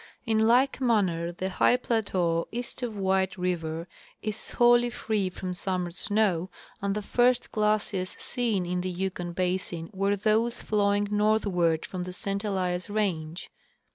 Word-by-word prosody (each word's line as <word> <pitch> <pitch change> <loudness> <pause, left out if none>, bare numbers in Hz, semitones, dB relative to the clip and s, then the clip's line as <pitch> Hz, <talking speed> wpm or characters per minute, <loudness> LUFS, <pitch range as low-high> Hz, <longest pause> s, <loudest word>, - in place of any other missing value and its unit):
In 220 -2 +2
like 260 +3 +3
manner 185 -9 +2
the 185 +2 -3
high 245 - +4
plateau 185 -9 0
east 240 +3 -3
of 230 -4 -3
White 190 -1 +1
river 170 -2 -2 0.4
is 215 0 -3
wholly 240 0 +5
free 215 -5 -1
from 185 0 -5
summer 180 -1 -2
snow, 190 -2 0 0.3
and 200 0 0
the 210 - -3
first 245 +3 +2
glaciers 210 -3 0
seen 225 -7 -1
in 180 +1 -1
the 185 - -2
Yukon 180 -1 -3
basin 180 -2 -2
were 195 +1 +1
those 220 +4 +1
flowing 205 -1 +1
northward 205 -6 +2
from 185 - -5
the 180 0 -5
St 200 +2 -2
Elias 185 -3 -1
range. 180 -6 -2
195 Hz, 145 wpm, -27 LUFS, 180-215 Hz, 0.4 s, wholly